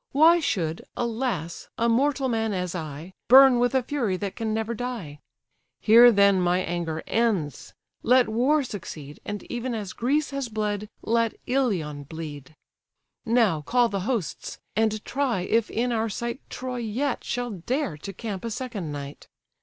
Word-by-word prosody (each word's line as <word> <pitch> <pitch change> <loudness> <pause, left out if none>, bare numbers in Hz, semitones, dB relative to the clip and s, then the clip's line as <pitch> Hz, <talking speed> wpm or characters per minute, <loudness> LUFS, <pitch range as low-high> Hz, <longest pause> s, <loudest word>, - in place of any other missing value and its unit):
Why 325 +4 +6
should, 185 - -1 0.2
alas, 230 - -3
a 230 - +2
mortal 270 +3 +2
man, 225 -3 0
as 180 -2 -2
I, 160 +1 -6
Burn 265 -1 +8
with 245 +2 +2
a 260 - +3
fury 235 -8 -1
that 200 0 -4
can 225 -2 -2
never 220 +1 -1
die? 220 -11 -5 0.6
Here 235 +2 +8
then 200 -3 +4
my 180 0 +2
anger 170 -3 -3
ends: 200 - -1 0.3
let 250 0 +4
war 260 +7 +2
succeed, 165 - -8
And 205 -1 -5
even 245 0 -4
as 205 -4 -5
Greece 285 +6 0
has 275 -3 -3
bled, 210 -1 -2
let 230 0 +1
Ilion 180 - -1
bleed. 150 -2 -8 0.7
Now 220 -9 +3
call 240 - +2
the 200 - -2
hosts, 230 -10 -3 0.2
and 215 -1 0
try 265 -8 0
if 225 +4 +1
in 245 +2 -1
our 225 -1 0
sight 235 +4 -4
Troy 255 0 -5
yet 240 +4 -2
shall 245 -1 -3
dare 210 - -2
to 195 - -7
camp 195 -1 -6
a 230 - -3
second 215 - -4
night! 140 0 -8
225 Hz, 160 wpm, -25 LUFS, 180-245 Hz, 0.7 s, Burn